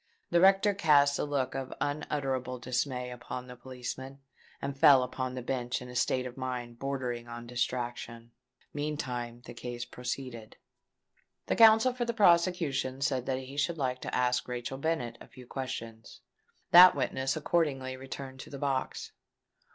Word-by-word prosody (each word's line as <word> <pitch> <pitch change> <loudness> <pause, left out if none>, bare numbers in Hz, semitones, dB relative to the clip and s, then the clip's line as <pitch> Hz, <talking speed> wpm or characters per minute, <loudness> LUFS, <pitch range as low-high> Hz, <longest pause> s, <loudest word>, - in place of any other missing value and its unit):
The 170 0 +4
rector 195 +2 +5
cast 145 -6 +4
a - - 0
look 140 -3 -1
of 135 -1 -4
unutterable 135 -3 -2
dismay 125 +1 -2
upon 125 +1 -6
the 125 0 -10
policeman, 130 +2 -7 0.4
and 140 - -4
fell 140 -3 +7
upon 130 0 -4
the 125 - -5
bench 125 -1 -2
in 125 - -9
a 125 - -9
state 130 +1 +1
of 125 0 -7
mind 125 -2 -5
bordering 125 -3 -3
on 120 0 -8
distraction. 120 -1 -3 0.4
Meantime 125 -5 -4
the - - -9
case 120 -1 -6
proceeded. 125 -3 -6 0.9
The - - 0
counsel 225 +2 +7
for 245 -1 -2
the 235 0 -2
prosecution 170 - +2
said 130 -3 0
that 130 - 0
he 130 +2 -8
should 165 +4 0
like 130 -3 -2
to - - -4
ask 125 0 +1
Rachel 125 +2 -4
Bennet 140 -7 -2
a - - -11
few 130 -1 -14
questions. 115 -4 -7 0.5
That 180 +1 +10
witness 135 0 -1
accordingly 145 -5 0
returned 130 0 -8
to - - -9
the 140 - -7
box. 135 -1 -2
130 Hz, 160 wpm, -30 LUFS, 125-145 Hz, 0.9 s, That